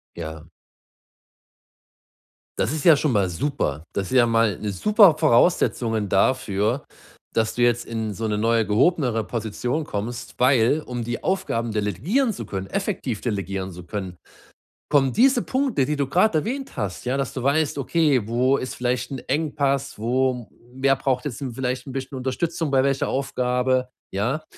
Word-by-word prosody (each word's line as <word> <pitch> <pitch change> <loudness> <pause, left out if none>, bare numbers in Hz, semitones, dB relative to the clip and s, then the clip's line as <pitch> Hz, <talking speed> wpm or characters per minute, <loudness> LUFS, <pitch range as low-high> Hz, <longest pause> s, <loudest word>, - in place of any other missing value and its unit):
Ja. 80 -2 -7 2.1
Das - - +1
ist 155 -2 -3
ja 165 -4 +8
schon 145 0 0
mal 100 -3 +2
super. 85 - -2
Das 95 +2 -3
ist - - +2
ja 120 -2 +6
mal 115 -4 +2
'ne 105 - -2
super 200 - +5
Voraussetzungen 120 - +2
dafür, 105 +4 +1 0.5
dass 110 -1 +1
du 120 - +1
jetzt 120 0 +3
in 110 -2 -4
so 110 +2 -3
'ne 105 -1 -1
neue 115 +1 +2
gehobenere 115 - +2
Position 120 +6 -3
kommst, 115 +1 -5
weil, 125 +3 +4
um 120 -1 -4
die 120 +1 -4
Aufgaben 120 - -1
delegieren 125 - 0
zu - - -7
können, 95 -1 -5
effektiv 185 - -2
delegieren 100 -4 -3
zu 90 +1 -9
können, 95 -2 -6 0.7
kommen 135 -3 +3
diese 255 +2 +4
Punkte, 260 - 0
die 150 - -1
du 140 -2 0
grad 180 +7 +2
erwähnt 250 - -2
hast, 100 +4 -4
ja, 130 - 0
dass 135 -1 -2
du 130 - -5
weißt: 145 +1 +1
„Okay, 140 -5 +1
wo 125 +4 +2
ist 130 - -5
vielleicht 125 +1 -2
'n 135 - -4
Engpass, 140 -3 0
wo 125 +1 0 0.3
wer 135 +1 +3
braucht 130 -1 -1
jetzt 140 -4 -5
'n 135 -3 -4
vielleicht 125 0 -3
'n 135 - -7
bisschen 135 0 -5
Unterstützung 155 +5 -2
bei 135 -1 +3
welcher 135 -1 +1
Aufgabe,“ 125 -1 0 0.2
ja? 125 +11 -1
125 Hz, 165 wpm, -23 LUFS, 110-140 Hz, 2.1 s, ja